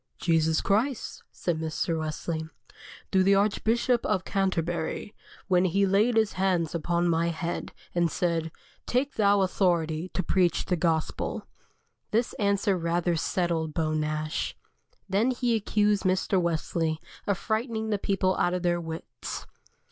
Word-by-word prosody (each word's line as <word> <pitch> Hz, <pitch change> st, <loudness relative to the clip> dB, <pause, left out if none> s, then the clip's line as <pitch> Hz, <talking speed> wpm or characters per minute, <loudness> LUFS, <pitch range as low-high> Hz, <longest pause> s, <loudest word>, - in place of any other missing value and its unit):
"Jesus 160 Hz, -2 st, +2 dB
Christ," 225 Hz, +5 st, 0 dB
said 170 Hz, -3 st, -2 dB
Mr. 160 Hz, +1 st, -1 dB
Wesley, 160 Hz, +1 st, -3 dB, 0.6 s
"through 190 Hz, -, +4 dB
the 195 Hz, +1 st, +5 dB
Archbishop 225 Hz, +4 st, +2 dB
of 195 Hz, -4 st, 0 dB
Canterbury, 175 Hz, 0 st, -1 dB, 0.3 s
when 185 Hz, -1 st, +3 dB
he 195 Hz, +3 st, +2 dB
laid 210 Hz, +5 st, +3 dB
his 220 Hz, -2 st, +3 dB
hands 180 Hz, -4 st, +1 dB
upon 170 Hz, +1 st, 0 dB
my 165 Hz, 0 st, +2 dB
head, 170 Hz, +1 st, -3 dB, 0.2 s
and 170 Hz, -1 st, +2 dB
said: 165 Hz, -2 st, -1 dB, 0.4 s
'Take 265 Hz, +3 st, 0 dB
thou 200 Hz, -2 st, +3 dB
authority 175 Hz, -3 st, +1 dB
to 185 Hz, -, 0 dB
preach 175 Hz, -1 st, +2 dB
the 180 Hz, -, +1 dB
gospel.'" 160 Hz, -2 st, -1 dB, 0.6 s
This 230 Hz, +3 st, +1 dB
answer 200 Hz, -1 st, +2 dB
rather 170 Hz, 0 st, 0 dB
settled 165 Hz, -2 st, -1 dB
Beau 155 Hz, -2 st, 0 dB
Nash. 155 Hz, 0 st, -2 dB, 0.5 s
Then 205 Hz, +5 st, +2 dB
he 245 Hz, -1 st, +1 dB
accused 210 Hz, -1 st, +2 dB
Mr. 185 Hz, 0 st, +1 dB
Wesley 165 Hz, -1 st, -1 dB, 0.3 s
of 200 Hz, -2 st, +1 dB
frightening 220 Hz, 0 st, -2 dB
the 205 Hz, -, +1 dB
people 190 Hz, -2 st, +1 dB
out 175 Hz, +1 st, +2 dB
of 180 Hz, -, -3 dB
their 175 Hz, -1 st, +1 dB
wits. 160 Hz, 0 st, -6 dB
180 Hz, 140 wpm, -27 LUFS, 165-200 Hz, 0.6 s, the